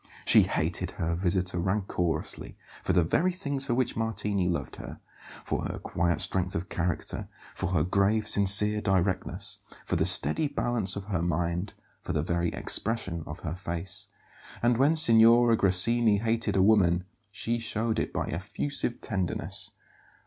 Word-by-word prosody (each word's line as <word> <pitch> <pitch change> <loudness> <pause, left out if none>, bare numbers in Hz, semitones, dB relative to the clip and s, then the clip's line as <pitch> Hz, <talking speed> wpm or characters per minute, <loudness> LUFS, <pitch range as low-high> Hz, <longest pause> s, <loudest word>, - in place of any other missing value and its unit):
She - - +6
hated - - -2
her 85 +1 -2
visitor 90 0 -1
rancourously, 95 -2 -3 0.3
for - - -2
the 90 - +3
very 170 - +1
things 140 -7 -3
for 120 - 0
which 125 -1 -1
Martini 105 -4 -1
loved 85 -6 -4
her; - - -10 0.4
for - - -3
her - - -5
quiet 85 0 -2
strength 90 -1 -1
of 85 +2 -4
character; 90 0 -3 0.3
for 95 - -3
her 80 -4 +2
grave, 100 +4 +1
sincere 105 +1 +5
directness; 95 -1 -2 0.3
for - - -1
the - - +1
steady 75 - +6
balance 120 -9 -1
of 100 - -5
her 95 -4 -3
mind; 85 +3 -2 0.3
for - - -5
the 75 -1 -1
very 85 +1 -1
expression 95 -7 0
of 75 +4 -8
her 80 -2 -4
face. 90 +2 -2 0.6
And 120 -1 +2
when 145 +4 +3
Signora 115 -4 +5
Grassini 105 +3 +3
hated 115 -1 -1
a 95 - +3
woman, 90 -4 +3 0.3
she 115 +3 -3
showed 110 0 -2
it - - -3
by - - -3
effusive 120 - -4
tenderness. 95 -5 -2
100 Hz, 155 wpm, -27 LUFS, 90-115 Hz, 0.6 s, She